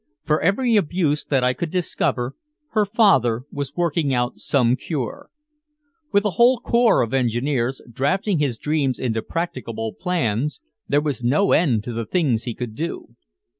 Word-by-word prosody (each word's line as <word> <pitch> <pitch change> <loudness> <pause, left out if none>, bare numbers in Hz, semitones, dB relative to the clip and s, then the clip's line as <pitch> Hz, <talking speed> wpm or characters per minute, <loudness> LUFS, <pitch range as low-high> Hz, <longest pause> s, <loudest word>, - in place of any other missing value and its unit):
For 155 -1 +1
every 230 +6 +2
abuse 160 -5 +1
that 135 -3 +1
I 125 0 +3
could 165 +6 -4
discover 140 -7 -1 0.4
her 215 -1 +2
father 135 - +3
was 140 0 -5
working 165 -5 0
out 120 0 -1
some 125 -3 +2
cure. 175 - -5 0.8
With 200 -1 +3
a 210 - +2
whole 245 +1 +6
corps 235 - +3
of 115 - -4
engineers 130 +1 0
drafting 175 - 0
his 135 -6 0
dreams 145 -3 0
into 115 -3 -1
practicable 115 -10 -4
plans, 150 - -1 0.3
there 145 +1 +2
was 145 -6 -3
no 145 +12 +2
end 125 -11 +3
to 120 - -5
the 115 -1 -4
things 130 -11 +1
he 120 - -4
could 120 -3 -5
do. 150 -4 -5
145 Hz, 160 wpm, -22 LUFS, 120-180 Hz, 0.8 s, whole